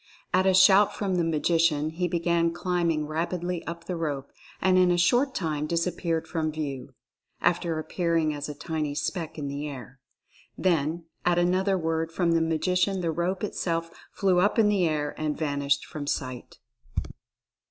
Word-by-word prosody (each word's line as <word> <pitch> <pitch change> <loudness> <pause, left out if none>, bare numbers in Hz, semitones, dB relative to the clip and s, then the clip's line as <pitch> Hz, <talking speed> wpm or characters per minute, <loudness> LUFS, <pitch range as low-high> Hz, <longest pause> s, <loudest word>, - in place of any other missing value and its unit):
At 185 +1 +3
a 190 - +5
shout 190 +2 +6
from 195 -3 -1
the 175 - +2
Magician 160 -1 +2
he 175 +2 -1
began 170 0 +1
climbing 170 -3 0
rapidly 170 +3 -2
up 170 0 -5
the 180 - -3
rope, 145 -5 -3 0.3
and 185 0 +3
in 180 -1 +5
a 175 - +3
short 245 +10 +3
time 155 -4 -1
dis 170 +1 0
appeared 170 -2 -2
from 160 -2 -1
view, 140 -4 -5 0.4
after 170 -1 +1
appearing 165 0 0
as 145 0 -5
a 150 - -6
tiny 155 -3 -3
speck 160 +1 -3
in 145 -2 -4
the 140 +2 -4
air. 135 -1 -10 0.6
Then 165 -2 0 0.2
at 175 -1 +2
another 185 +2 +2
word 165 -1 -1
from 170 0 +1
the 165 0 +3
Magician 180 +4 +1
the 165 -2 0
rope 180 +4 -2
itself 165 -4 -2 0.2
flew 185 -3 +2
up 205 +5 +2
in 215 -2 +5
the 195 -4 +2
air 150 -2 -1
and 150 -1 -1
vanished 140 -2 0
from 145 -2 -7
sight. 130 -3 -4
165 Hz, 170 wpm, -27 LUFS, 155-180 Hz, 0.6 s, shout